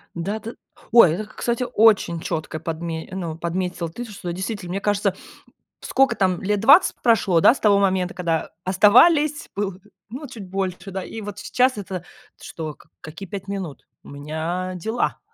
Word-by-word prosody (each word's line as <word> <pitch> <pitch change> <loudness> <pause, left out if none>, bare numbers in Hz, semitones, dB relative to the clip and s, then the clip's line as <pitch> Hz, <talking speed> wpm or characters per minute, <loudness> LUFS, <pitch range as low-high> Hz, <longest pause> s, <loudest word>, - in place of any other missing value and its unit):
Да, 200 +6 -3
ты 230 +2 -7 0.4
Ой, 230 -9 +8
это 210 +6 -3
ты, 215 - -18
кстати, 240 +1 -1
очень 205 -6 +4
чётко 160 -3 -4
подме 165 0 -5
ну, 170 -4 -4
подметила 175 0 -3
ты, 240 +9 -7
что 200 -6 -6
действительно, 190 0 -5
мне 195 +2 -2
кажется, 205 -2 0 0.7
сколько 265 -3 +2
там, 185 -2 +1
20 215 - +5
лет - - -39
прошло, 215 -7 +3
да, - - +7
с - - -8
того 200 -2 +4
момента, 185 -2 +1
когда 170 -3 -2
оставались, 265 - +4
было 195 -2 -2 0.3
ну, 270 +5 -7
чуть 220 -6 -10
больше, 190 0 -4
да, 190 0 -4
и 225 - -7
вот 205 0 -7
сейчас 255 0 +1
это 190 -3 -5 0.4
что? 155 -2 -6
Как - - -23
какие 165 +5 -9
5 195 -1 -6
минут? 190 -7 -6 0.2
У - - -14
меня 160 +6 -4
дела. 220 +7 -2
195 Hz, 170 wpm, -22 LUFS, 175-220 Hz, 0.7 s, Ой